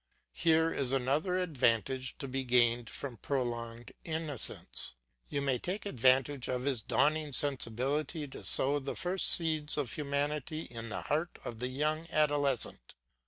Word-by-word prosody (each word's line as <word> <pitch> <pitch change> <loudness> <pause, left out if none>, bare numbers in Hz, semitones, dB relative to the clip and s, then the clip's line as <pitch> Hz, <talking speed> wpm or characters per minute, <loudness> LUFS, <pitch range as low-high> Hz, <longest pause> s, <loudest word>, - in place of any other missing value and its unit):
Here 160 0 +3
is 135 -1 +1
another 140 +8 +1
advantage 130 - 0
to 140 - -6
be 135 +1 -2
gained 120 -2 +3
from 130 -4 -6
prolonged 120 -3 -3
innocence; 160 - 0 0.3
you 140 - -2
may 130 -3 +1
take 195 +4 -4
advantage 130 - +2
of 125 -1 -2
his 135 -4 0
dawning 150 +4 +1
sensibility 140 +4 0
to 135 - -10
sow 140 +2 +4
the 135 0 -5
first 180 +1 +1
seeds 155 -3 +2
of 140 -6 -2
humanity 150 +1 -2
in 115 -5 -7
the - - -4
heart 160 +4 -1
of 115 -2 -6
the 125 - -1
young 155 +5 -1
adolescent. 145 - +1
140 Hz, 145 wpm, -32 LUFS, 125-155 Hz, 0.3 s, sow